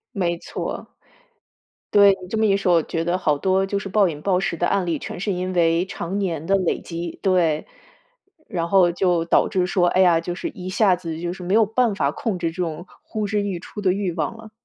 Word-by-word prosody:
没 175 -3 0
错。 - - -6 1.0
对， 200 -1 +6
你 - - -8
这 200 - -4
么 220 - +3
一 195 -1 +3
说， 190 -2 +2
我 165 - +5
觉 165 +1 -3
得 175 +1 0
好 150 -5 +1
多 190 +4 +1
就 200 - -1
是 200 0 -4
暴 195 -1 +3
饮 150 -3 -6
暴 185 -2 +2
食 180 -3 -2
的 175 - 0
案 195 -3 0
例， 165 - 0
全 175 - -7
是 200 +2 -1
因 185 0 -3
为 170 0 +2
常 190 0 -5
年 170 -6 -2
的 195 - +3
累 185 -3 0
积。 170 0 -6
对， 170 -5 +1 0.8
然 170 -5 -3
后 185 -2 +5
就 175 -1 +1
导 - - +3
致 185 -1 +1
说， 180 -1 +2
哎 185 - +3
呀， 170 -3 +4
就 175 +1 -4
是 335 - -4
一 185 -7 -8
下 195 -1 +3
子 165 -2 -6
就 175 +1 -3
是 185 - -11
没 180 +3 0
有 225 -1 +5
办 225 0 +1
法 140 -5 +1
控 205 0 -3
制 165 -1 -2
这 180 +2 -5
种 165 0 -4 0.2
呼 215 -1 -4
之 205 0 0
欲 200 -3 -2
出 205 - -9
的 190 -2 +3
欲 190 -2 -1
望 165 +6 -3
了。 220 -1 -12
180 Hz, 260 characters per minute, -22 LUFS, 170-195 Hz, 1.0 s, 对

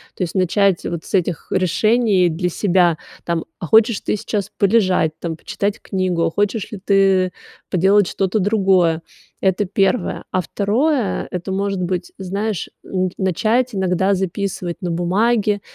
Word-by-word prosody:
То 185 - -2
есть 170 - -4
начать 190 0 +2
вот 170 -2 -4
с - - -11
этих 180 -4 -1
решений 195 +1 +2
для 175 +2 -1
себя, 175 -3 +2 0.3
там, 170 -1 -1
а 170 - -5
хочешь 220 +3 +4
ты - - -1
сейчас 205 -1 -3
полежать, 190 -6 +3
там, 165 -1 -4
почитать 200 +5 -3
книгу, 180 -4 -1
хочешь 205 +1 -1
ли 210 - -6
ты 195 -2 +3 0.4
поделать 190 +2 +3
что-то 195 +4 -1
другое. 190 -5 +2 0.4
Это 190 +1 +1
1. 195 +4 0
А 185 - +1
2, 225 - 0
это 180 +1 -4
может 195 0 -1
быть, 180 0 -3
знаешь, 200 0 -3
н 185 -1 -2
начать 220 +6 +1
иногда 190 +1 +1
записывать 185 -1 -3
на 180 - -2
бумаге 205 +4 +1
190 Hz, 145 wpm, -19 LUFS, 180-205 Hz, 0.4 s, хочешь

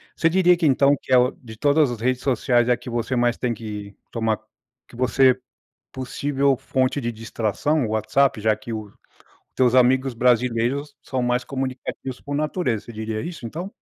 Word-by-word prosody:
Você 165 - +2
diria 180 0 +4
que 170 -1 -1
então 140 0 +4
que 130 - -2
é - - +8 0.3
de 110 -2 -11
todas 145 +2 +3
as 120 - -5
redes 130 +2 0
sociais 125 -2 +2
é 125 - +3
que - - -9
você 120 +2 -2
mais 120 -1 +2
tem 125 -2 -1
que 105 -2 -7 0.2
tomar 110 -2 0 0.5
que - - -16
você 130 +1 +3 0.5
possível 135 +1 0
fonte 130 +1 0
de 120 -2 -2
distração 115 +6 -1
o - - -5
WhatsApp, 110 +4 +1
já 110 0 +3
que 110 +2 -8
o, 110 -1 -4
os 100 - -20 0.6
teus 125 -1 +3
amigos 130 +1 +4
brasileiros 125 +4 +1
são 130 -1 -2
mais 125 0 +1
comunicativos 130 -1 -5
por 145 0 -4
natureza. 150 - -1
Você 120 - -10
diria 110 0 -4
isso, 165 -6 -7
então? 170 - -6
125 Hz, 180 wpm, -23 LUFS, 115-140 Hz, 0.6 s, é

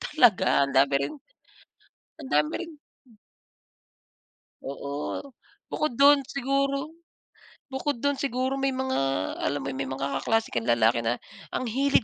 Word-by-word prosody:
talaga 235 - +4
andami 140 0 +3
rin - - -5 1.1
andami 150 - +1
ring 330 -2 -9 1.9
Oo, 140 +1 -4 0.5
bukod 305 -4 -1
do'n 280 -1 +7
siguro 275 +2 -1 0.8
bukod 265 -1 -2
do'n 285 -1 +1
siguro 265 0 -1
may 270 -1 0
mga 260 0 -1 0.5
alam 145 - -1
mo - - -4
'yon, 130 - -6
may 135 - -2
mga 135 +1 -3
kaklase 225 0 0
kang 115 -2 -2
lalaki 115 0 +4
na 115 +1 0 0.4
ang - - -1
hilig 270 +4 +2
250 Hz, 125 wpm, -27 LUFS, -, 1.9 s, do'n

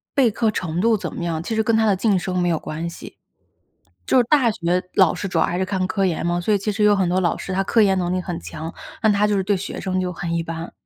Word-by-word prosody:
备 255 -5 +4
课 225 +1 +1
程 170 -5 -3
度 230 0 +3
怎 - - -6
么 175 - -5
样， 165 -2 -2
其 225 - -3
实 220 - +2
跟 225 +1 +1
他 220 0 +3
的 205 -2 +3
晋 200 0 +2
升 180 0 -3
没 175 0 +1
有 165 - +1
关 160 +3 -5
系。 - - -11 0.9
就 - - +4
是 - - +4
大 265 -6 +4
学 180 -1 -1
老 185 -4 +4
师 195 - -4
主 170 -3 -1
要 - - +4
还 175 - -2
是 190 - 0
看 185 -1 -1
科 195 0 0
研 170 -3 -1
嘛， 175 0 0
所 210 +5 +1
以 - - +4
其 210 +2 -1
实 210 +1 -1
有 210 0 +5
很 190 -3 +1
多 180 +1 +1
老 175 -3 +1
师 - - -6
他 195 - +1
科 225 +3 +3
研 195 -2 +3
能 180 0 -1
力 185 - 0
很 175 -2 -5
强， 160 +1 -7 0.3
但 220 -2 +4
他 205 +1 +2
就 210 - +1
是 190 - +1
对 200 0 +1
学 185 - -6
生 185 -1 -1
就 180 -1 -2
很 170 0 -4
一 165 - -1
般， 165 0 -6
185 Hz, 325 characters per minute, -21 LUFS, 175-210 Hz, 0.9 s, 有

